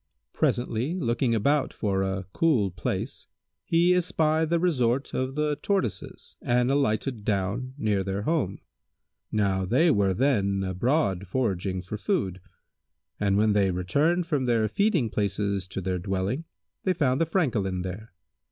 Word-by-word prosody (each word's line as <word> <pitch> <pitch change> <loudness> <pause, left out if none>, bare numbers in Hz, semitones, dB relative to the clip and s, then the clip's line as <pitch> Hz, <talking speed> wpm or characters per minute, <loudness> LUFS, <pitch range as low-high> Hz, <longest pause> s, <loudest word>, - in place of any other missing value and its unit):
Presently, 120 +6 0
looking 120 -6 0
about 140 +6 +2
for 100 -3 -1
a 95 0 -2
cool 125 - +2
place, 90 - -4 0.4
he 170 +2 +3
espied 160 -3 +1
the 170 - +3
resort 135 -7 +1
of 130 +1 -2
the 150 -1 0
Tortoises 195 - -3
and 125 +1 +2
alighted 125 -3 0
down 105 +6 -2
near 105 -6 0
their 100 +1 -3
home. 135 - -1 0.7
Now 100 -3 +1
they 140 - +3
were 100 -5 +2
then 100 -7 +1
abroad 95 - 0
foraging 95 -5 -1
for 100 +3 -5
food, 105 - -1 0.8
and 100 -1 +2
when 105 0 +3
they 100 -2 +3
returned 145 - +1
from 145 -6 0
their 115 -3 +2
feeding 165 - +1
places 100 -2 -1
to 95 - -5
their 90 0 -2
dwelling, 95 - -2 0.4
they 185 - +2
found 140 -3 +1
the 165 - +2
Francolin 105 - 0
there. 95 +5 -7
115 Hz, 145 wpm, -26 LUFS, 95-145 Hz, 0.8 s, he